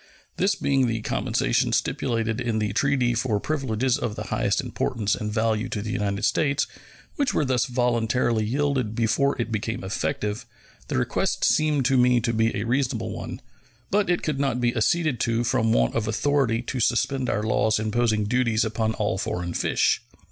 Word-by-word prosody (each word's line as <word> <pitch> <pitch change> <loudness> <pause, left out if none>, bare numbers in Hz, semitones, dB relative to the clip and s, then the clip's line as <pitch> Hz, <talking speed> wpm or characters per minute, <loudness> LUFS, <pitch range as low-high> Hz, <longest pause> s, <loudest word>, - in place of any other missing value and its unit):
This 195 +2 +2
being 135 -2 +1
the 115 -1 -1
compensation - - 0
stipulated 115 0 -1
in 120 -2 -1
the 105 -2 -1
treaty 130 0 +2
for 115 -3 0
privileges 130 -3 -1
of 110 -3 -3
the - - -5
highest - - +1
importance 105 -2 -1
and 105 0 -3
value 110 +2 0
to 110 - -3
the 105 - -4
United 100 -2 -1
States, 145 -1 +1 0.5
which 285 -3 0
were 150 - +2
thus 130 -2 +1
voluntarily 120 -2 +1
yielded 130 -1 -1
before 125 +5 +1
it 115 -1 -2
became 115 +1 -3
effective, 105 +3 -3 0.4
the - - -2
request - - -1
seemed 150 -4 +2
to 135 +1 +3
me 125 0 +4
to 115 0 -1
be 115 0 +2
a 105 - -3
reasonable 130 +2 -1
one; - - -6 0.5
but 205 -1 +2
it 175 - +1
could 150 -3 -1
not 135 -3 0
be 120 0 +1
acceded 155 +3 +1
to 115 0 +1
from 115 -1 +1
want - - +2
of 110 -2 -1
authority 120 0 +1
to 125 - -4
suspend 125 +3 +1
our 105 - 0
laws 110 0 +2
imposing 110 0 +1
duties 115 0 +1
upon 110 0 -1
all 105 -4 -1
foreign 90 -2 -3
fish. - - +1
120 Hz, 175 wpm, -25 LUFS, 110-130 Hz, 0.5 s, me